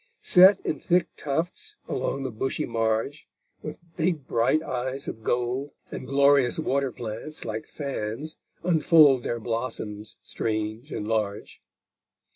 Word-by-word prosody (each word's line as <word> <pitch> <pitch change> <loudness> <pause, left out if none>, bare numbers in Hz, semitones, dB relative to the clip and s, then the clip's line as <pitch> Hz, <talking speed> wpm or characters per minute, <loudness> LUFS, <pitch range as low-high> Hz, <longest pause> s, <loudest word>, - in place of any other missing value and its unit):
Set 190 +2 +7
in - - -2
thick 175 -2 +2
tufts 175 - -3
along 135 - -2
the 130 - -3
bushy 125 +5 -2
marge 115 +5 -1 0.3
With 155 - -6 0.2
big 160 -4 0
bright 120 +8 +2
eyes 130 0 -3
of 110 - -5
gold; 125 +5 -1 0.2
And - - -6
glorious 140 -2 +4
water 140 -4 0
plants, 120 +7 -6
like 110 -1 -4
fans, 140 +1 -4 0.3
unfold 160 -5 +5
Their 120 0 -2
blossoms 110 -2 -4
strange 110 +5 -3
and 105 - -4
large. 105 -2 -2
130 Hz, 125 wpm, -26 LUFS, 115-155 Hz, 0.3 s, Set